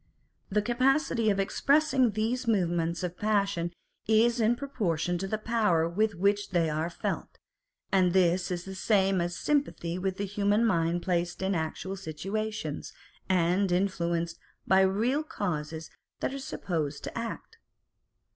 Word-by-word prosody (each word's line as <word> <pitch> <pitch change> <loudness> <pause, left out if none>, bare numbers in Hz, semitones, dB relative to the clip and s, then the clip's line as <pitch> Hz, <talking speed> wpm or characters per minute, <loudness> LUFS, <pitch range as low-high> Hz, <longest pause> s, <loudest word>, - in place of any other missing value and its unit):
The 210 +1 +1
capacity 255 -1 +2
of 200 -1 +1
ex 195 - -2
pressing 275 -6 +3
these 235 +3 -1
movements 170 -5 +1
of 180 0 -4
passion 200 -5 +1 0.4
is 230 +2 +4
in 225 +1 +3
proportion 175 - -1
to 195 - -3
the 215 - -1
power 210 -7 +2
with 205 +4 0
which 200 +3 +1
they 170 -4 +1
are 155 +2 -1
felt; 170 - -4 0.5
and 185 -2 +4
this 180 0 +3
is 175 -1 -3
the 190 - -6
same 190 -1 +2
as 175 0 -2
sympathy 185 - -1
with 190 0 -2
the 200 - -2
human 205 +3 +1
mind 170 -4 +1
placed 175 0 -1
in 190 +1 +1
actual 170 +3 -3
situations, 195 0 -4 0.4
and 185 +1 +2
influenced 170 -3 0 0.3
by 190 0 +5
the 190 - +2
real 240 +9 +1
causes 160 - -4 0.3
that - - -2
are 275 - -4
supposed 155 - -3
to - - -6
act. 230 - -6
195 Hz, 150 wpm, -29 LUFS, 170-220 Hz, 0.5 s, by